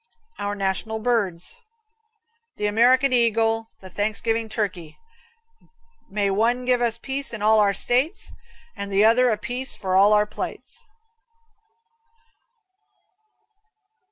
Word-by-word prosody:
Our 205 0 -3
National 195 +3 -2
Birds. 220 - -2 1.0
The 210 - -2
American 250 +6 +3
Eagle, 225 -1 +1
the 190 - -10
Thanksgiving 220 +3 -1
Turkey: 185 -8 -4 1.1
may 200 0 0
one 235 +5 +1
give 250 -1 +2
us 235 -1 0
peace 270 +3 -2
in 215 -3 -6
all 220 0 +4
our 200 -1 +3
States 260 - 0 0.4
and 200 -2 -6
the 200 +2 +4
other 245 +3 +4
a 220 - 0
piece 255 +4 -4
for 185 -2 -2
all 200 +2 +5
our 210 0 +4
plates. 470 - -7
220 Hz, 115 wpm, -23 LUFS, 205-245 Hz, 1.1 s, all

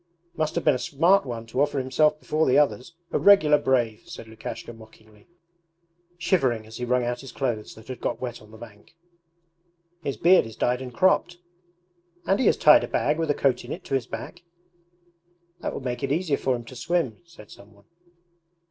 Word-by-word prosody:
'Must 155 -2 -2
have 170 - -1
been 150 - +4
a 125 - -2
smart 165 +6 +2
one 115 -2 -5
to 115 +4 -2
offer 145 0 +1
himself 150 +4 +1
before 155 +1 0
the 130 - +4
others; 145 +2 0 0.2
a - - 0
regular 155 -8 +6
brave!' 120 -5 0
said 110 - -9
Lukashka 110 +1 -8
mockingly, 110 -1 -18 0.9
shivering 130 - 0
as 110 +1 -11
he 125 - -4
wrung 125 0 +1
out 120 0 -3
his 135 -2 -10
clothes 120 -6 -3
that 110 0 -15
had 130 -1 -8
got - - -2
wet 120 -2 -6
on 105 - -17
the 110 - -14
bank. 110 +5 -14 1.1
'His 140 -6 -4
beard 175 -1 +5
is 110 - -11
dyed 125 +2 0
and 130 -1 -7
cropped.' 180 +4 +2 0.9
'And 195 - +1
he 255 - +2
has - - +3
tied 150 -1 +6
a - - -3
bag 150 +2 0
with 165 -2 -1
a 145 - +2
coat 130 -3 +1
in - - -9
it - - -6
to - - -7
his 130 -3 0
back.' 175 - -8 1.2
'That - - -3
would - - -6
make 125 -1 -3
it 140 - -2
easier 160 -1 +1
for 130 -1 0
him 120 -1 -8
to 130 - -12
swim,' 135 -2 -2
said 165 -11 -16
some 100 +1 -15
one. 100 -1 -23
130 Hz, 205 wpm, -25 LUFS, 115-155 Hz, 1.2 s, regular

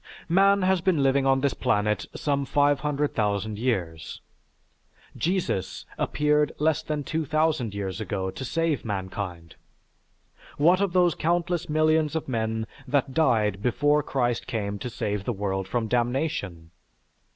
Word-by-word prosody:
Man 195 +3 +4
has 185 -1 +2
been 175 -6 +2
living 135 0 +3
on 135 0 +3
this 140 -1 +1
planet 105 -4 0
some 140 -1 0
500,000 140 -8 0
years. 90 -10 -2 1.0
Jesus 175 - -2
appeared 150 0 +1
less 155 0 +1
than 150 -1 -3
2000 155 -7 0
years 100 0 -4
ago 95 -3 -3
to 130 - -7
save 160 +2 -1
mankind. 95 -4 -5 1.0
What 175 +6 +4
of 195 -3 0
those 180 -2 +4
countless 175 +1 -1
millions 155 0 +2
of 160 - -2
men 110 -3 -1 0.2
that 140 -2 0
died 110 -10 +2
before 145 +5 +2
Christ 120 -4 -1
came 105 -5 -3
to 125 - -4
save 105 -4 -3
the 120 - -2
world 95 -1 -2
from 115 +2 -1
damnation? 120 - -1
135 Hz, 130 wpm, -26 LUFS, 105-155 Hz, 1.0 s, Man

